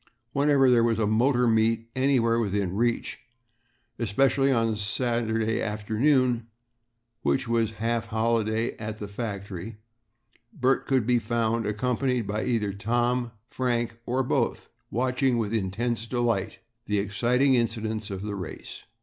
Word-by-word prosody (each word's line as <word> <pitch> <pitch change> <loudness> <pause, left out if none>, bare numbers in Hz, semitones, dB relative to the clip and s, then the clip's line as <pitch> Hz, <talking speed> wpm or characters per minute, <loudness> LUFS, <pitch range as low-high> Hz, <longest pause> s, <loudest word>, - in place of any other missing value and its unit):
Whenever 140 -1 +4
there 120 -2 +5
was 115 -2 +2
a 110 - +1
motor 120 +4 +3
meet 115 0 +1
anywhere 130 -3 +2
within 100 -4 -1
reach, 120 +2 0 0.8
especially 135 +5 +2
on 115 -3 +1
Saturday 115 +1 0
afternoon, 115 +3 +1 0.7
which 130 -2 0
was 115 -2 +1
a - - -16
half 115 +1 -1
holiday 110 0 0
at 110 -1 -5
the 105 - -6
factory, 100 -1 -6 0.7
Bert 135 - +1
could 130 -5 +2
be 120 0 +3
found, 115 0 0
accompanied 125 +3 0
by 105 +2 -2
either 110 -5 0
Tom 120 +4 0
or 115 - -12 0.2
Frank, 120 -2 -1
or 130 +2 +1
both, 125 -1 -1 0.2
watching 130 +1 +1
with 110 -2 -1
intense 115 +3 -1
delight 120 -1 -1 0.3
the 105 - +1
exciting 120 +7 +2
incidents 110 -3 -1
of 95 -1 -5
the 105 -1 -4
race. 90 -5 -7
115 Hz, 135 wpm, -26 LUFS, 110-125 Hz, 0.8 s, there